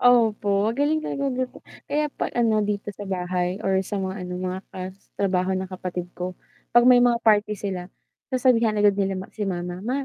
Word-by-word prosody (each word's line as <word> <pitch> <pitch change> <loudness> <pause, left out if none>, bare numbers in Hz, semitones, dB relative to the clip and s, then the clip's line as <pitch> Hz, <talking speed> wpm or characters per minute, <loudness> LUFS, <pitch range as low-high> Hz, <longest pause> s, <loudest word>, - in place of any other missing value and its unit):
Opo, 215 -4 +4
magaling 290 +6 +1
talaga 280 -2 -3
magluto, 255 -1 -2 0.3
kaya 300 0 0
pa - - -2
ano, 225 -3 +3
dito 205 0 -2
sa 205 0 -8
bahay 180 0 -1
or 190 0 +3
sa 200 +2 -4
mga, 190 -1 -3
ano, - - -5
mga 185 +1 -3 0.6
trabaho 190 -1 +1
ng 190 - -2
kapatid 180 -1 -5
ko, 180 0 -5 0.3
'pag 240 0 +5
may 250 -1 +7
mga 245 -1 +4
party 210 -1 +4
sila, 185 -2 -4 0.4
sasabihan 240 -4 +3
agad 205 -1 +5
nila 195 -1 0 0.2
si 210 -2 -3
mama. 175 0 -4
"Ma 260 +6 -2
205 Hz, 180 wpm, -24 LUFS, 185-240 Hz, 0.6 s, may